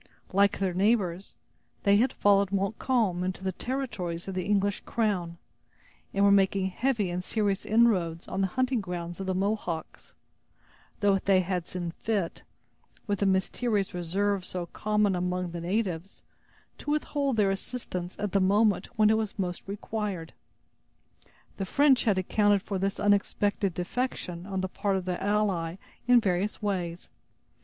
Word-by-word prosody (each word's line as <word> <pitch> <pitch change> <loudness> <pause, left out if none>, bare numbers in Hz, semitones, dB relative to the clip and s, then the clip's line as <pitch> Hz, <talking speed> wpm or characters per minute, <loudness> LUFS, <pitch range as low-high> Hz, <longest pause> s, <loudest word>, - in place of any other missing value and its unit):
Like 200 +1 +4
their 190 -2 0
neighbors, 190 -2 +1 0.5
they 200 0 +5
had 245 +5 +3
followed 200 -1 +3
Montcalm 200 -1 0
into 185 0 -3
the 190 - 0
territories 190 -8 -4
of 195 - -4
the 185 -1 -2
English 200 -1 +1
crown, 190 -7 -1 0.7
and 200 0 +3
were 200 - +6
making 195 -1 +3
heavy 225 -3 0
and 180 +1 -3
serious 205 -1 -1
inroads 190 -8 +2
on 190 - -2
the 190 - +2
hunting 255 +4 0
grounds 175 -2 -5
of 190 - -4
the 185 - 0
Mohawks; 190 -4 -3 0.9
though 200 -1 +4
they 190 -1 +3
had 180 -1 -2
seen 175 -2 -4
fit, 200 -2 -2 0.6
with 200 -2 -1
the 200 - +2
mysterious 195 +2 0
reserve 190 +3 0
so 180 -1 -4
common 210 +2 +1
among 180 0 -2
the 170 0 -5
natives, 185 -1 -2 0.6
to - - -6
withhold 290 -3 0
their 200 -2 +3
assistance 190 -4 -5
at 205 -2 -2
the 195 - +2
moment 205 +1 +3
when 215 0 +5
it 220 - +3
was 220 -2 -3
most 180 -2 -3
required. 200 -4 -4 1.2
The 195 - -2
French 280 0 +4
had 205 -4 +3
accounted 205 +1 +2
for 195 -2 -3
this 195 +1 -1
unexpected 205 -2 +1
defection 180 -3 -3
on 190 -1 -2
the 190 - -1
part 195 +1 -1
of 185 -1 -2
their 180 -1 -3
ally 195 -5 0 0.3
in 245 -1 +7
various 195 -1 0
ways. 180 -5 -3
195 Hz, 155 wpm, -28 LUFS, 180-210 Hz, 1.2 s, in